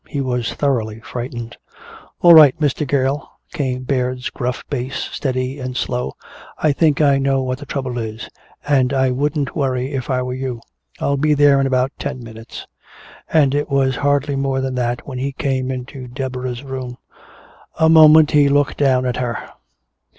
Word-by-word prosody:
He 145 - -4
was 125 -3 -1
thoroughly 115 -6 -1
frightened. 120 0 -7 0.6
"All 175 -1 +8
right, 155 -1 +8
Mr. 150 0 0
Gale," 135 +1 0 0.2
came 130 -6 -2
Baird's 125 -1 -2
gruff 125 0 -3
bass, 130 -1 -4 0.2
steady 130 0 -3
and 125 -1 -5
slow, 125 - -2 0.4
"I 155 - +2
think 150 0 +2
I 140 -2 +4
know 135 -1 +1
what 130 0 -3
the 145 - -10
trouble 130 -3 -3
is 110 0 -6 0.4
and 135 -2 +2
I 130 -1 +2
wouldn't 145 +2 -1
worry 130 -2 -1
if 130 -3 -4
I 130 -1 0
were 125 0 -4
you. 130 -2 -4 0.4
I'll 140 0 0
be 150 +1 +2
there 140 -1 +5
in 135 - +1
about 130 0 +1
ten 140 -3 -5
minutes." 115 0 -10 0.6
And 145 -4 +3
it 145 +1 -1
was 135 -2 +1
hardly 145 0 +1
more 135 -1 -1
than 130 0 -2
that 120 -1 -2
when 130 -2 -5
he 135 +1 -3
came 130 -1 -2
into 130 0 -6
Deborah's 130 0 -5
room. 130 -2 -6 0.8
A 160 - +5
moment 155 -1 +7
he 145 -2 +4
looked 145 0 +1
down 130 -3 +2
at 125 -1 -1
her. 120 -2 -2
130 Hz, 170 wpm, -19 LUFS, 125-140 Hz, 0.8 s, All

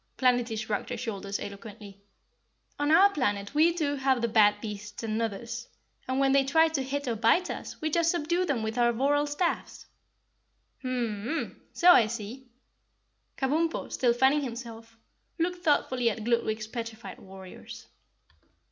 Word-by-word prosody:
Planetty 245 -3 +2
shrugged 215 -2 -3
her - - -4
shoulders 200 -4 -4
eloquently. 200 -1 -9 0.8
"On 290 0 +1
our 380 +6 +6
planet 205 - -1
we 315 +3 +5
too 300 -4 -1
have 265 -1 +2
the 235 - 0
bad 210 -2 +4
beasts 210 0 -7
and 215 -1 -2
Nuthers, 230 +2 -4 0.4
and 260 +1 -1
when 270 0 +3
they 275 0 +4
try 320 +4 +4
to 315 -4 -1
hit 280 +1 -3
or 235 - 0
bite 230 - +2
us, - - -7
we 310 0 -1
just 335 +1 +2
subdue 345 +1 0
them 280 -10 -1
with 220 +2 -3
our 240 0 +4
voral 290 +4 +1
staffs." 330 +4 -2 1.0
"Mmmn 235 -5 -2
mn! 320 +7 -4
So 355 0 +6
I 230 -10 +6
see." 235 +4 -7 0.9
Kabumpo, 315 +5 -1
still 245 -2 +2
fanning 265 +4 +3
himself, 230 -3 -8 0.4
looked 350 +1 -2
thoughtfully 255 -6 +2
at 220 0 -5
Gludwig's 220 -2 0
petrified 230 0 -7
warriors. 190 -1 -11
245 Hz, 155 wpm, -28 LUFS, 220-290 Hz, 1.0 s, our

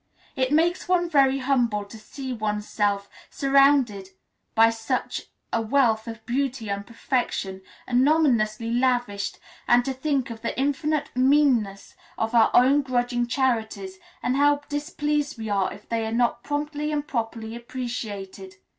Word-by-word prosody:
It 260 0 0
makes 335 +4 +2
one 355 -1 +3
very 275 -3 +4
humble 245 -6 +1
to 215 +2 -12
see 260 +4 -7
oneself 210 -2 -1 0.2
surrounded 275 -8 +3 0.5
by 225 0 +6
such 225 +3 -3 0.3
a 230 - +2
wealth 225 -2 +2
of 225 -1 -8
beauty 255 -3 -2
and 200 0 -4
perfection 230 -5 -2 0.2
anonymously 245 -5 +2
lavished, 245 -5 0 0.3
and 240 0 +4
to 270 - -1
think 265 -2 -1
of 225 -1 -8
the 230 - -3
infinite 285 +2 0
meanness 255 -7 +2 0.2
of 225 +1 -2
our 230 -2 +5
own 270 +4 +5
grudging 245 -2 -1
charities, 260 - -1 0.2
and 255 +2 +1
how 290 0 +3
displeased 295 -1 -2
we 220 -1 -5
are 195 -2 +1
if 200 - -12
they 230 -1 -1
are - - -4
not 240 +1 +1
promptly 295 +1 -3
and 295 -1 -2
properly 225 -3 -3
appreciated. 210 -6 -6
245 Hz, 140 wpm, -25 LUFS, 220-280 Hz, 0.5 s, by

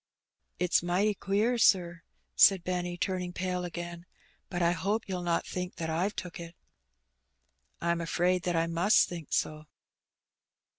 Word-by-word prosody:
'' - - -49
''It's 180 -1 +3
mighty 185 +5 +1
queer, 210 +5 0
sir," 175 -5 +3 0.3
said 195 -3 +6
Benny, 180 -1 -2
turning 180 -1 -2
pale 180 0 -2
again; 175 0 -6 0.4
"but 175 - -3
I 170 - +4
hope 200 +6 -1
you'll 185 -2 -3
not 170 -1 0
think 180 0 -5
that 160 -1 -3
I've 180 +6 -1
took 180 -1 -6
it." 170 0 -9 0.7
" 65 +1 -44
I'm 170 0 +1
afraid 180 +2 +1
that 175 - 0
I 165 - +2
must 170 +5 +3
think 170 -4 -8
so." 155 0 -1
175 Hz, 155 wpm, -29 LUFS, 170-185 Hz, 0.7 s, said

